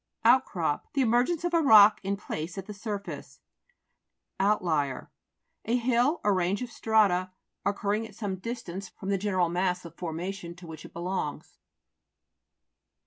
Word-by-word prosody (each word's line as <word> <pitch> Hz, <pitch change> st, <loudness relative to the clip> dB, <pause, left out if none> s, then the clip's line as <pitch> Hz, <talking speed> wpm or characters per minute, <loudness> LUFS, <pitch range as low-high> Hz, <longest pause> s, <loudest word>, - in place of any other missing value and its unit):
OUTCROP 175 Hz, -, +2 dB
The 275 Hz, -, +2 dB
emergence 250 Hz, +8 st, +2 dB
of 350 Hz, 0 st, -1 dB
a 335 Hz, -, +4 dB
rock, 215 Hz, -7 st, +8 dB
in 200 Hz, +1 st, -1 dB
place, 165 Hz, -3 st, -5 dB
at 195 Hz, -, -5 dB
the 210 Hz, -, -7 dB
surface. 205 Hz, 0 st, -6 dB, 1.0 s
OUTLIER 165 Hz, -9 st, 0 dB, 0.5 s
A 235 Hz, +3 st, +2 dB
hill 250 Hz, +6 st, +2 dB
or 205 Hz, -, +3 dB
range 185 Hz, +5 st, 0 dB
of 245 Hz, -, -7 dB
strata 200 Hz, -6 st, +2 dB, 0.4 s
occurring 205 Hz, +2 st, -1 dB
at -, -, -17 dB
some 200 Hz, -4 st, -3 dB
distance 195 Hz, -4 st, -6 dB
from 195 Hz, -, -8 dB
the 195 Hz, -1 st, +1 dB
general 185 Hz, -3 st, +1 dB
mass 180 Hz, 0 st, -1 dB
01 170 Hz, -, -9 dB
formation 175 Hz, +1 st, -5 dB
to 180 Hz, 0 st, -13 dB
which 160 Hz, -1 st, -9 dB
it -, -, -13 dB
belongs. 175 Hz, -3 st, -4 dB
195 Hz, 145 wpm, -28 LUFS, 180-225 Hz, 1.0 s, rock